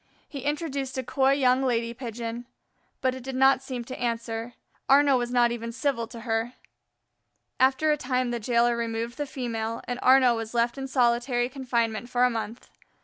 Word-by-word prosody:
He 280 - -7
introduced 280 -2 -3
a 260 - -1
coy 265 +2 +2
young 260 -2 +3
lady 235 -3 0
Pigeon. 235 -1 -6 0.5
But 260 -1 +1
it 260 - -7
did 265 +1 -6
not 265 0 +4
seem 255 -3 -5
to 255 +2 -8
answer; 230 0 -3 0.3
Arnaux 280 0 +6
was 240 -1 0
not 240 -1 +3
even 230 -1 -4
civil 255 -2 -1
to 235 0 -10
her. 225 +1 -1 1.1
After 265 +4 +3
a 300 - +2
time 250 -2 -1
the 240 - -2
jailer 235 +1 +2
removed 230 0 -3
the 290 - -2
female, 230 -4 -4
and 245 0 -3
Arnaux 255 -2 +5
was 225 +1 -5
left 235 0 +2
in 270 - -4
solitary 245 -1 +1
confinement 240 -4 -2
for 245 0 +2
a 250 - +4
month. 225 0 -6
245 Hz, 180 wpm, -26 LUFS, 235-265 Hz, 1.1 s, Arnaux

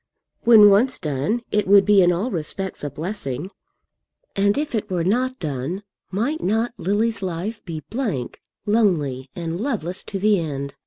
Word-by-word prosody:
When 215 -3 +8
once 245 +6 +3
done 155 - -2
it 210 -2 +1
would 200 0 +6
be 205 -1 +6
in 175 -1 +5
all 190 +9 -1
respects 185 +2 -4
a 145 - -2
blessing. 160 0 -5 0.8
And 200 +3 +2
if 300 -1 -2
it 220 - -2
were 180 -3 -1
not 255 +7 0
done, 155 - -4 0.3
might 245 - -1
not 225 +5 0
Lily's 215 +4 0
life 190 +4 -4
be 165 -4 -5
blank, 210 - -3 0.2
lonely, 160 - +1
and 170 +1 -4
loveless 205 - -3
to 200 - -4
the 205 0 +3
end? 140 -4 -4
195 Hz, 160 wpm, -22 LUFS, 165-220 Hz, 0.8 s, When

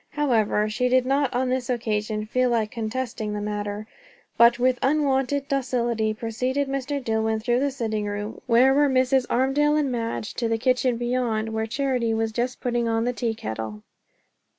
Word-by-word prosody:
However, 225 -7 +1
she 245 +4 0
did 255 0 +3
not 275 0 +1
on 255 +1 0
this 255 -1 -1
occasion 215 -3 -1
feel 255 +3 +1
like 225 -3 0
contesting 230 -2 -3
the 210 - -3
matter; 205 0 -4 0.5
but 235 0 +6
with 250 0 +2
unwonted 275 -1 +1
docility 240 -5 0
preceded 250 +5 -2
Mr. 275 +1 -2
Dillwyn 220 -3 0
through 240 +2 +1
the 280 +1 +1
sitting 220 -5 -3
room, 205 +1 -5
where 250 +3 +5
were 290 +1 +4
Mrs. 260 0 +2
Armadale 275 +4 +2
and 295 -3 +1
Madge, 230 -2 -3
to 235 -2 -2
the 225 - +1
kitchen 250 0 +1
beyond, 240 -2 -1
where 220 0 -1
Charity 245 -2 0
was 225 0 -1
just 245 +3 -2
putting 240 -1 0
on 225 0 +1
the 245 - 0
tea 235 -2 -2
kettle. 110 - -6
240 Hz, 175 wpm, -24 LUFS, 220-260 Hz, 0.5 s, but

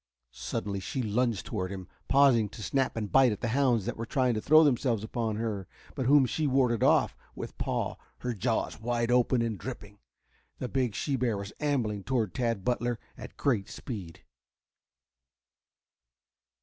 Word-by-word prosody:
Suddenly 100 -1 -4
she 110 +7 -3
lunged 110 -1 0
toward 95 -5 -3
him, 95 -2 -7 0.2
pausing 130 -6 +5
to 105 +1 -9
snap 135 -1 0
and 105 -3 -3
bite 135 -3 +6
at 105 - -5
the 120 - -1
hounds 125 -4 +2
that - - -3
were 115 - -3
trying 130 -1 +2
to 110 - -2
throw 155 +6 +7
themselves 125 -6 +2
upon 110 -1 -2
her, 105 -4 -3 0.3
but 130 -4 -2
whom 140 -1 +6
she 150 +4 -1
warded 130 -4 +2
off - - +4 0.2
with - - -7
paw, - - -2 0.2
her 125 -1 -2
jaws 115 +1 -1
wide 120 0 0
open 125 0 +3
and 110 -3 -2
dripping. 105 -5 -8 0.6
The 125 - -3
big 125 -6 0
she 140 - -1
bear 120 -4 0
was 100 +1 -6
ambling 120 -9 0
toward 115 -7 0
Tad 115 -6 -1
Butler 120 -1 0 0.2
at - - -10
great 115 -9 0
speed. 95 -10 -7
120 Hz, 165 wpm, -29 LUFS, 105-130 Hz, 0.6 s, throw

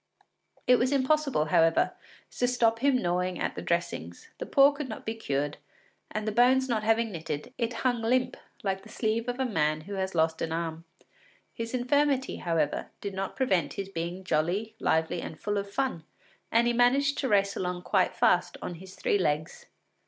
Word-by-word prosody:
It 250 0 +6
was 250 +2 +1
impossible, 275 - +2
however, 165 +1 +3 0.4
to 245 - 0
stop 230 -2 +2
him 270 0 +3
gnawing 180 +1 0
at - - -1
the - - -6
dressings; 170 - -3
the - - -5
paw 275 +1 +6
could 285 -2 -6
not - - -7
be 220 - -2
cured, 145 -9 -2 0.5
and 215 0 -4
the - - +1
bones 255 +4 +4
not 230 -4 0
having 225 +1 +2
knitted, 160 - -5
it 235 0 0
hung 245 -2 +2
limp 250 +2 +1 0.3
like 195 -1 -1
the 220 - -15
sleeve 225 +2 -1
of 245 +1 -3
a 265 - +1
man 155 -8 0
who 200 +6 -8
has 190 -1 -2
lost 160 0 +1
an 160 - -2
arm. 165 0 -3 0.7
His 230 +2 -4
infirmity, 265 +1 +1
however, 165 -3 -1
did 200 -1 -5
not 190 0 -4
prevent 190 - +1
his 195 -1 -5
being 175 +1 -4
jolly, 185 +6 0
lively, 160 0 +1
and 155 - -8
full 205 -1 -1
of 200 0 -5
fun, 255 -7 -2 0.5
and 230 +1 +4
he 240 - +2
managed 270 +4 +3
to 270 - 0
race 200 -1 +3
along 180 -1 -3
quite - - +1
fast - - +2
on - - -5
his 190 0 -11
three 205 - +1
legs. 155 -3 -2
205 Hz, 190 wpm, -28 LUFS, 170-245 Hz, 0.7 s, It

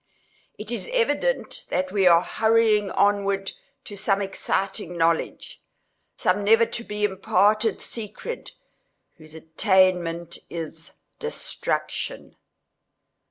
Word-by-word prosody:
It 210 +2 -7
is 240 - -4
evident - - 0
that 185 0 -1
we 195 -2 +3
are 170 0 +6
hurrying 220 -2 +2
onwards 200 0 +1 0.3
to 205 - -8
some 195 0 +1
exciting 195 -1 -2
knowledge—some 165 +4 -2
never 225 +3 +5
to 235 - -6
be 210 -2 -5
imparted 205 +2 +2
secret, 235 - -5 0.6
whose 155 -1 -14
attainment 170 0 +1
is 160 -1 -7 0.3
destruction. 465 +1 -3
200 Hz, 95 wpm, -24 LUFS, 180-220 Hz, 0.6 s, are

